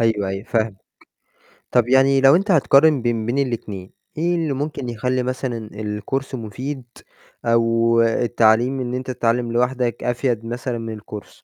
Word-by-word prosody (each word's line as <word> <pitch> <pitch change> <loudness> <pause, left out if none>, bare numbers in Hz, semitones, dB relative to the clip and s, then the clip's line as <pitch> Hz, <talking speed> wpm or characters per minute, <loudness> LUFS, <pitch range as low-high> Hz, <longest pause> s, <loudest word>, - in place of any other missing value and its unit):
أيوه، 110 -4 +1
أيوه، 95 +1 -4
فاهمك. 110 -3 -1 0.9
طب 120 -1 +2
يعني 135 +1 +4
لو 135 +3 +7
أنت 200 +3 -1
هتقارن 145 -3 +5
بين 115 -2 -1
بين 120 +4 -1
الاتنين، 110 -8 -3 0.3
إيه 170 +2 +1
اللي 160 -4 -1
ممكن 140 -2 -4
يخلّي 125 +2 -1
مثلًا 125 -3 -4
الCourse 105 +6 -4
مفيد، 130 +4 -5 0.6
أو 115 0 +3
التعليم 115 +2 +2
إن 125 -1 -3
أنت 130 0 -4
تتعلّم 120 -1 0
لوحدك 125 0 0
أفيَد 120 -2 -1
مثلًا 120 +1 -4
من 115 -1 -6
الCourse؟ 105 0 -9
120 Hz, 145 wpm, -21 LUFS, 115-130 Hz, 0.9 s, لو